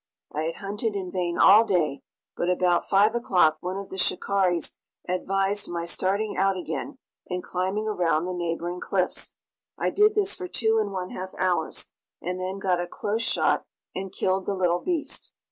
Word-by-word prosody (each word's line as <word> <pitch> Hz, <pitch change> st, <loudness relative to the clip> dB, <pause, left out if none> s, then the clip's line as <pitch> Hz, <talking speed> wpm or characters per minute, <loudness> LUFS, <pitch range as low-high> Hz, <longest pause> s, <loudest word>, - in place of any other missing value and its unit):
I 155 Hz, +1 st, -1 dB
had 165 Hz, -, -2 dB
hunted 205 Hz, +2 st, -3 dB
in 185 Hz, -2 st, -3 dB
vain 175 Hz, -2 st, -1 dB
all 210 Hz, +3 st, +8 dB
day, 165 Hz, -10 st, +1 dB, 0.3 s
but 175 Hz, -, 0 dB
about 180 Hz, -1 st, +2 dB
5 205 Hz, +3 st, +5 dB
o'clock 180 Hz, -9 st, +3 dB
one 185 Hz, +3 st, -3 dB
of 200 Hz, 0 st, -6 dB
the 190 Hz, -, -6 dB
shikaris 185 Hz, -2 st, +1 dB, 0.3 s
advised 195 Hz, +2 st, 0 dB
my 170 Hz, -1 st, -3 dB
starting 195 Hz, +5 st, 0 dB
out 195 Hz, 0 st, +2 dB
again 265 Hz, +9 st, -4 dB, 0.3 s
and 180 Hz, -1 st, -2 dB
climbing 190 Hz, +4 st, -1 dB
around 175 Hz, -5 st, +1 dB
the 185 Hz, -, -3 dB
neighboring 175 Hz, 0 st, -2 dB
cliffs. -, -, -1 dB, 0.4 s
I -, -, 0 dB
did 425 Hz, +1 st, +4 dB
this 405 Hz, -2 st, +1 dB
for 370 Hz, -, -5 dB
two 225 Hz, -8 st, +2 dB
and 205 Hz, -2 st, -2 dB
one 185 Hz, -1 st, -4 dB
half 185 Hz, +1 st, -6 dB
hours, 175 Hz, -3 st, -1 dB, 0.3 s
and 180 Hz, +2 st, -3 dB
then 185 Hz, +1 st, -3 dB
got 185 Hz, -2 st, +1 dB
a 175 Hz, -, -3 dB
close 210 Hz, +5 st, -2 dB
shot -, -, +1 dB, 0.3 s
and 190 Hz, 0 st, -4 dB
killed 190 Hz, 0 st, 0 dB
the 200 Hz, -, 0 dB
little 175 Hz, -2 st, +2 dB
beast. 335 Hz, -, -3 dB
185 Hz, 180 wpm, -26 LUFS, 175-205 Hz, 0.4 s, all